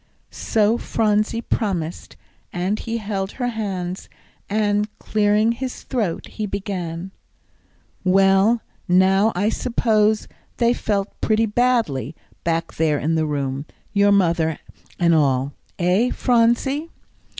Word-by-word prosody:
So 220 +1 +1
Phronsie 215 +1 0
promised; 175 -9 -3 0.4
and 185 +4 -1
he 230 0 -3
held 200 -3 -3
her 245 -2 -2
hands, 190 -5 -4 0.4
and, 210 0 +1
clearing 210 +1 +2
his 255 +2 -5
throat, 215 -10 -2
he 215 -1 -5
began, 190 -3 -4 0.9
"Well, 195 +4 +4 0.2
now 190 +4 +4
I 200 +4 +1
suppose 220 -3 +1 0.3
they 235 0 +3
felt 205 -4 -2
pretty 220 +1 +2
badly, 210 - 0 0.3
back 165 0 -1
there 155 -2 +2
in 155 +3 -1
the 160 -1 +1
room, 140 -1 -3 0.3
your 205 0 +4
mother 165 -5 +2 0.4
and 170 -1 +3
all 140 -3 +2 0.2
eh, 185 +7 +2
Phronsie?" 250 +7 +1
200 Hz, 115 wpm, -21 LUFS, 175-225 Hz, 0.9 s, Well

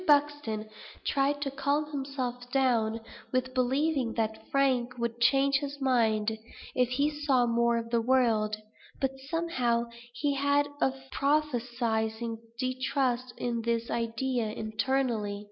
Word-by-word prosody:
Buxton 290 -7 +2 0.4
tried 285 +1 +1
to 275 - -2
calm 290 +2 0
himself 260 -3 -4
down 230 -4 +2 0.3
with 255 0 0
believing 265 0 +1
that 220 -1 -2
Frank 255 -3 +1
would 235 0 -3
change 275 +3 +4
his 285 0 -5
mind, 220 -5 +2 0.3
if 250 -2 +2
he 285 +4 +1
saw 290 -4 +2
more 235 0 +2
of 230 0 -4
the 235 -1 +3
world; 225 -4 +2 0.4
but, 270 -1 +1 0.2
somehow, 245 -9 0 0.2
he 285 +4 0
had 285 +1 +2
a 265 - +4 0.2
prophesying 235 -6 0 0.2
distrust 255 -1 -1
of 235 -1 -1
this 230 0 -1
idea 235 +1 -1
internally. 220 -1 -1
250 Hz, 125 wpm, -29 LUFS, 230-275 Hz, 0.4 s, change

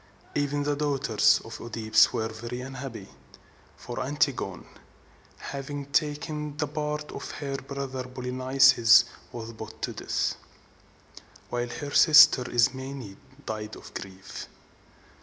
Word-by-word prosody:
Even 145 0 0
the 145 0 0
daughters 140 -6 +3
of - - -8
OEdipus 110 -2 +3
were 110 0 -2
very 120 +3 -6
unhappy; 130 -6 -7 0.7
for 120 - -6
Antigone, 135 - -1 0.7
having 140 +1 -6
taken 150 0 -1
the 150 - 0
part 150 0 -4
of - - -7
her 140 -2 -4
brother 135 -1 -5
Polynices, 130 -1 +5 0.3
was 115 -1 -7
put 110 - -10
to - - -2
death, - - -2 1.1
while 120 0 -2
her 145 +2 -6
sister 150 -5 +7
Ismene 130 -2 0 0.3
died 110 0 -5
of - - -13
grief. 95 0 -8
130 Hz, 115 wpm, -27 LUFS, 120-145 Hz, 1.1 s, sister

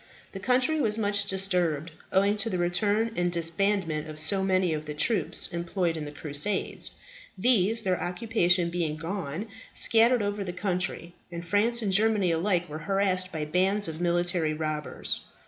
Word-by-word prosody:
The 195 - -7
country 255 +8 +2
was 215 -3 +1
much 205 -2 0
disturbed, 180 -5 0 0.2
owing 200 +2 +3
to 210 +2 0
the 185 - -2
return 205 +6 +1
and 175 0 0
disbandment 170 -1 0
of 155 0 -8
so 175 +6 +2
many 185 -3 +2
of 155 0 -5
the 150 - -5
troops 185 +2 +1
employed 170 0 -1
in 155 -2 -5
the 145 - -7
Crusades. 150 +6 -1 0.5
These, 225 0 +2
their 185 -2 0
occupation 180 -3 +1
being 170 -3 -1
gone, 165 +1 -4 0.3
scattered 230 0 +5
over 205 0 -2
the 180 -2 -5
country, 180 -2 -3 0.2
and 170 0 -6
France 220 +6 +1
and 195 -2 0
Germany 210 -3 +3
alike 175 +1 +1
were 150 +1 -7
harassed 190 -2 +1
by 155 -2 -3
bands 190 +6 +2
of 160 +1 -5
military 175 -2 +1
robbers. 155 -1 -3
185 Hz, 165 wpm, -27 LUFS, 165-205 Hz, 0.5 s, scattered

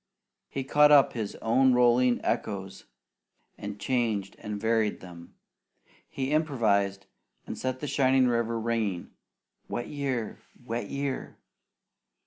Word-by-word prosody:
He 135 - -3
caught 150 +2 +5
up 145 -2 +6
his 110 -4 -4
own 130 +3 +4
rolling 125 0 +4
echoes 95 -2 -3 0.7
and 105 0 -7
changed 110 -4 -1
and 105 -1 -5
varied 110 -1 +1
them. 85 -2 -12 0.7
He 135 0 -3
improvised, 110 -11 +1 0.4
and - - -5
set 130 0 -3
the - - -3
shining 130 -2 +3
river 115 -1 0
ringing, 110 -6 -2 0.6
"Wet 120 - -4
year! 135 -6 -3 0.3
Wet 115 -3 -4
year!" 140 -1 -4
120 Hz, 115 wpm, -28 LUFS, 105-130 Hz, 0.7 s, up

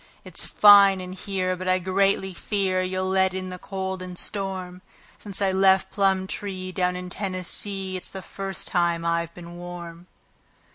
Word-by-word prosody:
It's - - +2
fine 200 -2 +7
in 185 0 -7
here, 185 -1 -2
but 185 +1 -6
I 185 0 +3
greatly 190 +1 +1
fear 190 0 -1
you'll 185 0 -2
let 190 0 +2
in 185 0 -4
the 180 - -7
cold 190 -1 -4
and 180 -1 -7
storm 185 -3 -3 0.4
Since 200 -1 -3
I 195 - +2
left 190 0 +3
Plumtree, 190 -1 -1
down 180 -1 0
in 180 0 -6
Tennessee, 190 0 -2
it's 180 - -6
the 190 -1 -7
first 195 -1 -4
time 170 -1 0
I've 170 0 0
been 175 0 -10
warm." 175 0 -9
185 Hz, 160 wpm, -25 LUFS, 180-195 Hz, 0.4 s, fine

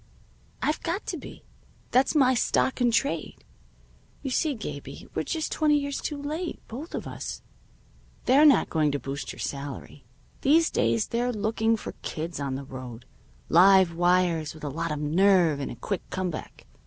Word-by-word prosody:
I've 305 - 0
got 345 +5 -2
to - - -3
be. - - -11 0.5
That's 260 +5 +3
my 260 -3 +5
stock 255 +1 +1
in 245 - +4
trade. 225 - -1 0.8
You 270 - -3
see, 295 +2 +1
Gabie, 215 - -7
we're - - -1
just 320 -2 -3
twenty 300 -1 +3
years 280 -1 -3
late, 300 +4 -4
both 275 +9 -7
of - - -4
us. - - -6 0.8
They're 270 +4 +6
not 295 -4 +5
going 155 -3 +2
to 145 - -1
boost 140 +1 -5
your - - -12
salary. 140 0 -6 0.4
These 320 +4 +4
days 225 - +2
they're 245 +1 0
looking 220 +1 +1
for - - -6
kids 165 +1 -4
on 140 -2 -2
the 135 - -5
road 125 -3 -9 0.4
live 185 0 +6
wires, 175 -3 +2
with 155 - -13
a 145 - -2
lot 160 +3 -3
of 150 - -2
nerve 165 0 +3
and 140 - -3
a - - -6
quick 200 - -3
come 185 -1 -2
back. 155 - -9
195 Hz, 170 wpm, -27 LUFS, -, 0.8 s, They're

